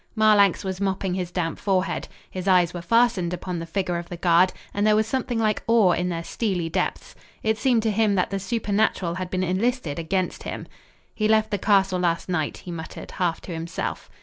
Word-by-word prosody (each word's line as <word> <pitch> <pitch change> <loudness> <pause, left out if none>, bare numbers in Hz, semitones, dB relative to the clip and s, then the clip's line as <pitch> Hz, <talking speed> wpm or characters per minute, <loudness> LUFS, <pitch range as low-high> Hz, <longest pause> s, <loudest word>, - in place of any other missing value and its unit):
Marlanx 210 -4 +4
was 190 0 -4
mopping 190 -1 -1
his 180 -1 -2
damp 170 -3 -2
forehead. 190 -2 0 0.2
His 185 0 -5
eyes 180 -3 +4
were 175 - -5
fastened 200 -4 +2
upon 180 -1 -5
the 165 - -6
figure 175 0 -1
of 170 - -9
the 175 - -6
guard, 175 +1 +4 0.2
and 205 +1 +1
there 215 - +5
was 215 +1 +3
something 245 +1 -2
like 215 -2 +1
awe 225 -5 +5
in 180 +1 0
their 170 -1 -3
steely 180 -5 -2
depths. - - -2 0.3
It 220 0 +1
seemed 245 -5 +2
to 220 - +1
him 210 -1 +2
that 185 0 0
the 195 - -1
supernatural 205 -4 0
had 185 0 -4
been 185 0 -1
enlisted 185 - -1
against 185 +3 -1
him. - - -6 0.5
"He 215 - 0
left 215 0 +3
the 205 - 0
castle 195 -2 +3
last 170 0 0
night," 160 -5 -1
he 180 - -9
muttered, 160 -2 -7
half 175 -3 -1
to 180 - -7
himself. 165 +1 -4
190 Hz, 205 wpm, -24 LUFS, 175-215 Hz, 0.5 s, there